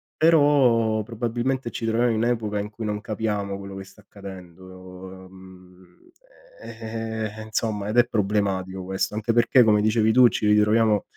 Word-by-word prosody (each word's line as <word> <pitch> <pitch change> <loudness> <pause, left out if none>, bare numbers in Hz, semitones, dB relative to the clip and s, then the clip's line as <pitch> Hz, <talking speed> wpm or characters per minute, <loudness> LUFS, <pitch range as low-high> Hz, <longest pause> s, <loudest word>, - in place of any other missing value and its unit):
però 135 -9 +3
probabilmente 120 +3 -3
ci - - -7
troviamo 120 +2 +1
in 110 - -1
un'epoca 110 -3 -1
in 105 - -4
cui 110 +1 -8
non 105 0 -3
capiamo 105 -3 -3
quello 100 0 -9
che 95 0 -8
sta 105 - -18
accadendo, 95 -3 -12 0.7
uhm, 90 -1 -17 0.6
ehm, 110 0 -6
e 110 - -8
insomma, 110 -2 -3
ed 110 - -3
è 120 - +6
problematico 95 -3 -2
questo, 95 +2 -3
anche 110 +1 -1
perché 120 +2 +4
come 105 -2 +3
dicevi 110 +1 +2
tu 125 +1 +6
ci 110 - -2
ritroviamo 105 0 +3
110 Hz, 155 wpm, -23 LUFS, 100-115 Hz, 0.7 s, è